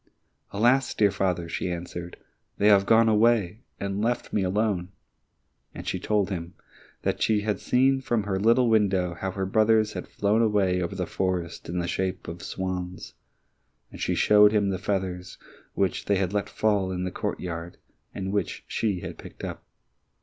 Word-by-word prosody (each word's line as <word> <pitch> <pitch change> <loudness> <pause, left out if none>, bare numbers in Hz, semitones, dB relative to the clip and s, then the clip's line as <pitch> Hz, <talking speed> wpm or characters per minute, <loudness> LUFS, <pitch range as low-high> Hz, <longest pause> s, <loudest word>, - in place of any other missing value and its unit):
"Alas, 120 +5 +2
dear 105 -2 +4
father," 90 -3 -1
she 85 - -3
answered, 85 0 -6 0.4
"they 105 - +4
have 100 -1 +5
gone 115 0 +5
away 110 -3 +3 0.2
and 100 0 -2
left 120 +2 -1
me 105 - +2
alone!" 95 -1 0 0.9
and - - -8
she - - -1
told 105 -2 0
him 85 -2 -5 0.5
that - - -1
she 110 -2 +2
had 105 -2 -1
seen 135 +2 +2
from 120 -5 0
her 95 -2 -1
little 115 +4 +4
window 100 -5 +2
how 95 +3 -4
her 95 0 -3
brothers 110 +2 +3
had - - -6
flown 105 +3 +1
away 100 -5 +2
over 90 +2 -3
the 90 -1 -2
forest 90 -3 -3
in 90 - -3
the 85 -1 -1
shape 95 +1 -2
of 85 +2 -7
swans, 90 -1 -5 0.8
and - - -10
she - - 0
showed 105 0 +6
him 105 -2 +2
the 95 -2 -2
feathers, 90 -2 -3 0.4
which 95 -2 0
they 100 - +2
had 95 0 -1
let 100 -1 -1
fall 100 -3 +1
in 90 0 -3
the 90 - -3
courtyard, 85 -1 -4 0.3
and 95 0 -4
which 100 - -2
she 100 -5 -1
had - - -7
picked - - -11
up. - - -6
100 Hz, 175 wpm, -26 LUFS, 90-105 Hz, 0.9 s, showed